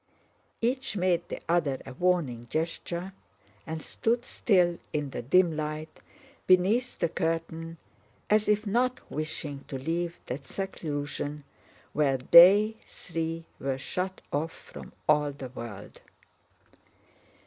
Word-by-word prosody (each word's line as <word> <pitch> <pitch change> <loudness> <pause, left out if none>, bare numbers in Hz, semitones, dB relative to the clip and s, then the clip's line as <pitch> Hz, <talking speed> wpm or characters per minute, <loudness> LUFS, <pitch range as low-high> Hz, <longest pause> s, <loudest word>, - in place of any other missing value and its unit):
Each 255 -1 -1
made 180 -2 +1
the - - -5
other 160 -6 +1
a 135 - -8
warning 140 -8 0
gesture 170 +4 -3 0.5
and 160 0 -4
stood 240 +2 0
still 180 -5 +2
in 145 -2 -2
the - - -4
dim 170 +6 +4
light 155 +1 -4 0.5
beneath 200 +7 +3
the 170 - +1
curtain 165 0 -2 0.5
as 215 0 +3
if 210 +1 +2
not 250 +5 +1
wishing 150 -2 -4
to 135 - -4
leave 170 +5 -2
that 130 +1 -6
seclusion 150 -5 -4 0.5
where 140 -3 +2
they 195 - +8
three 165 -1 -4
were 135 -1 -1
shut 185 +7 -3
off 160 +3 -1
from - - -12 0.2
all 150 -1 +4
the 135 -2 -7
world. 115 -5 -9
165 Hz, 120 wpm, -28 LUFS, 145-185 Hz, 0.5 s, they